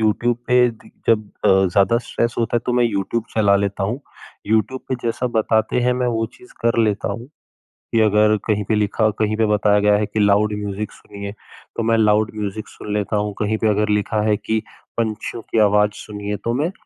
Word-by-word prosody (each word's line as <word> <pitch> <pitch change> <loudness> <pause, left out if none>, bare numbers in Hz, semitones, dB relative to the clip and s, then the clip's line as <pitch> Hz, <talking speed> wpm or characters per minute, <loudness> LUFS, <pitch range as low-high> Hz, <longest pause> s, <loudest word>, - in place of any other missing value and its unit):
YouTube 115 +2 +1
पे 125 0 +5
the 115 - -17 0.2
जब 110 -2 +3 0.2
अ, - - +5
ज़्यादा 95 +3 +4
स्ट्रेस 115 0 -2
होता 115 0 +1
है - - +1
तो 125 - +1
मैं 120 0 +3
यूट्यूब 110 +1 -1
चला 100 -2 +4
लेता 100 0 -1
हूँ, 115 +8 -2 0.5
यूट्यूब 110 +5 +1
पे 130 - 0
जैसा 120 +2 -1
बताते 110 +2 +2
हैं 125 +1 +2
मैं 125 0 -1
वो 115 -2 0
चीज़ 125 - -17
कर 115 0 +2
लेता 105 -2 0
हूँ 115 +3 -7 0.7
कि 115 - +2
अगर 105 0 +4
कहीं 105 -1 +1
पे 110 +2 0
लिखा 105 +1 +1
कहीं 110 0 +1
पे 110 - +3
बताया 105 0 +3
गया 105 0 +5
है 105 - 0
कि 105 +1 -4
लाउड 105 +1 +3
म्यूज़िक 105 0 -4
सुनिए, 100 0 -9 0.4
तो 115 - -1
मैं 115 0 +2
लाउड 105 0 +3
म्यूज़िक 105 0 -4
सुन 105 - -7
लेता 105 +1 -1
हूँ, 105 0 -1
कहीं 110 +1 0
पे 110 - 0
अगर 105 +1 +1
लिखा 105 +1 +1
है 105 - +3
कि 110 0 -1 0.4
पंछियों 115 0 -3
की 115 - +1
आवाज़ 105 0 +4
सुनिए 105 0 -4
तो 115 - +1
मैं 150 +8 0
110 Hz, 210 wpm, -20 LUFS, 105-115 Hz, 0.7 s, पे